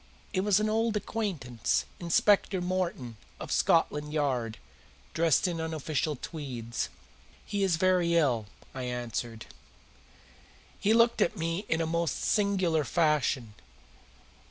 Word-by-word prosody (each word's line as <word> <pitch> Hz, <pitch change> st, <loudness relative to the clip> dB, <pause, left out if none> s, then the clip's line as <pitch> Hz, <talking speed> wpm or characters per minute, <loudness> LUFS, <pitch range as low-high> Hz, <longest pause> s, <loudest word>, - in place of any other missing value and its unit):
It 185 Hz, -, +1 dB
was 205 Hz, 0 st, +3 dB
an 215 Hz, -, +1 dB
old 220 Hz, 0 st, +1 dB
acquaintance, 180 Hz, -, -2 dB
Inspector 190 Hz, +2 st, +3 dB
Morton, 175 Hz, -10 st, -2 dB, 0.2 s
of -, -, -7 dB
Scotland 150 Hz, 0 st, +2 dB
Yard, 130 Hz, -7 st, -1 dB, 0.6 s
dressed 165 Hz, 0 st, +3 dB
in 170 Hz, -2 st, -2 dB
unofficial 155 Hz, -1 st, -2 dB
tweeds. 125 Hz, -6 st, -5 dB, 0.6 s
"He 205 Hz, -, -2 dB
is 190 Hz, -4 st, +3 dB
very 175 Hz, -1 st, +2 dB
ill," 125 Hz, -10 st, +2 dB, 0.3 s
I 130 Hz, -, -5 dB
answered. 120 Hz, -2 st, -4 dB, 1.3 s
He 205 Hz, -, +2 dB
looked 235 Hz, 0 st, +4 dB
at 210 Hz, -, +2 dB
me 165 Hz, +5 st, -2 dB
in 160 Hz, +1 st, +1 dB
a -, -, +1 dB
most 170 Hz, 0 st, 0 dB
singular 190 Hz, -7 st, +1 dB
fashion. 140 Hz, -5 st, +1 dB
165 Hz, 120 wpm, -29 LUFS, 130-185 Hz, 1.3 s, looked